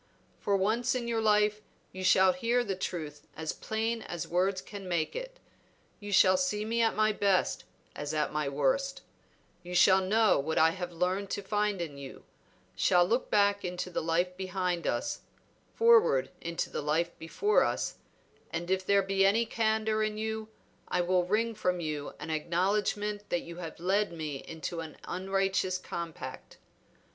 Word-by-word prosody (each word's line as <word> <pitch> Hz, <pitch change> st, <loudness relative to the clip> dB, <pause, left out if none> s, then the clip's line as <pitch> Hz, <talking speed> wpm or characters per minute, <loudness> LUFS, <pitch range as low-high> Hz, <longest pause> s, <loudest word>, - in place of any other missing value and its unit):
For 200 Hz, -1 st, +1 dB
once 230 Hz, +6 st, +1 dB
in 240 Hz, -2 st, -2 dB
your 230 Hz, -1 st, 0 dB
life 210 Hz, -1 st, +3 dB, 0.3 s
you 185 Hz, 0 st, -7 dB
shall 185 Hz, 0 st, +5 dB
hear 245 Hz, -1 st, +1 dB
the 200 Hz, -5 st, -2 dB
truth 155 Hz, -5 st, -5 dB
as 160 Hz, 0 st, -3 dB
plain 225 Hz, +1 st, -2 dB
as 175 Hz, -5 st, -5 dB
words 185 Hz, +2 st, +1 dB
can 200 Hz, -1 st, -9 dB
make 170 Hz, -3 st, -1 dB
it. -, -, -6 dB, 0.6 s
You 205 Hz, -1 st, -7 dB
shall 185 Hz, -1 st, +6 dB
see 210 Hz, +3 st, 0 dB
me 230 Hz, +1 st, 0 dB
at 225 Hz, -1 st, +2 dB
my 215 Hz, 0 st, +3 dB
best 200 Hz, -3 st, +1 dB, 0.3 s
as 145 Hz, 0 st, -4 dB
at 155 Hz, -1 st, -1 dB
my 150 Hz, -2 st, 0 dB
worst; 145 Hz, -, 0 dB, 0.6 s
you 180 Hz, 0 st, -7 dB
shall 190 Hz, +1 st, +6 dB
know 215 Hz, 0 st, +3 dB
what 160 Hz, +3 st, -2 dB
I 160 Hz, +1 st, +5 dB
have 180 Hz, 0 st, -5 dB
learned 185 Hz, +3 st, -1 dB
to 205 Hz, -, -3 dB
find 210 Hz, 0 st, 0 dB
in 145 Hz, -4 st, -8 dB
you; 135 Hz, -1 st, -10 dB, 0.5 s
shall 175 Hz, -1 st, +4 dB
look 235 Hz, +8 st, 0 dB
back 200 Hz, -1 st, +3 dB
into 180 Hz, 0 st, -4 dB
the -, -, -1 dB
life 175 Hz, +3 st, 0 dB
behind 180 Hz, -2 st, -2 dB
us, -, -, -1 dB, 0.5 s
forward 455 Hz, -, +5 dB
into 170 Hz, 0 st, -3 dB
the -, -, -3 dB
life 160 Hz, +4 st, 0 dB
before 410 Hz, -, +2 dB
us, -, -, -2 dB, 0.5 s
and 170 Hz, +2 st, -4 dB
if 190 Hz, 0 st, +1 dB
there 200 Hz, +1 st, +3 dB
be 195 Hz, 0 st, +1 dB
any 215 Hz, +4 st, +4 dB
candor 220 Hz, -1 st, 0 dB
in 215 Hz, 0 st, -1 dB
you 220 Hz, 0 st, -3 dB, 0.4 s
I -, -, +1 dB
will 180 Hz, 0 st, +2 dB
wring 225 Hz, +5 st, +1 dB
from 180 Hz, -4 st, -1 dB
you 155 Hz, -3 st, -4 dB
an 150 Hz, +2 st, -5 dB
acknowledgment 205 Hz, +6 st, -1 dB
that 175 Hz, -, 0 dB
you 170 Hz, 0 st, -9 dB
have 165 Hz, -3 st, -7 dB
led 195 Hz, +3 st, +1 dB
me 155 Hz, -4 st, -4 dB
into 165 Hz, +1 st, -5 dB
an 160 Hz, -2 st, -7 dB
unrighteous 190 Hz, 0 st, 0 dB
compact. 170 Hz, -2 st, -7 dB
190 Hz, 170 wpm, -30 LUFS, 170-215 Hz, 0.6 s, shall